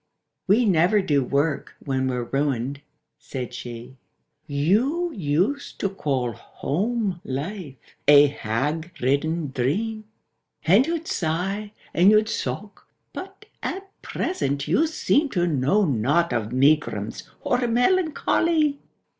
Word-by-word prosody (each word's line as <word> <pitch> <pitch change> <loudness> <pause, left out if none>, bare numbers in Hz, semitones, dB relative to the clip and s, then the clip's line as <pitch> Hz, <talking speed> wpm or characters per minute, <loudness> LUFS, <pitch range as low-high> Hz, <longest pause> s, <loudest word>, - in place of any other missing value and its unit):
— - - -57
"We 220 +5 +4
never 185 +2 +4
do 145 -8 +2
work 140 +4 -1
when 130 -1 -1
we're 125 -2 -1
ruined," 135 +1 -1 0.4
said 130 -4 -6
she. 120 +2 -8 0.5
—"You 225 - +1
used 185 - -1
to 195 - 0
call 135 -10 -1
home 195 - -2
life 145 +3 -5 0.3
a 145 0 +9
hag 145 +6 -2
ridden 145 +4 0
dream, 215 - -1 0.6
And 200 - +5
you'd 335 0 -2
sigh, 195 - -2 0.2
and 180 +3 +5
you'd 215 +1 +4
sock; 205 0 -5 0.3
but - - -9 0.2
at 390 +1 -5
present 140 - -2
you 320 - +3
seem 305 -1 +1
To 175 -7 +1
know 165 +6 +2
not 145 +4 +1
of 110 -2 -2
megrims 130 -6 +1
or 245 - +1
melancho 285 +11 +2
ly!" 310 -4 +2
165 Hz, 120 wpm, -24 LUFS, 135-215 Hz, 0.6 s, a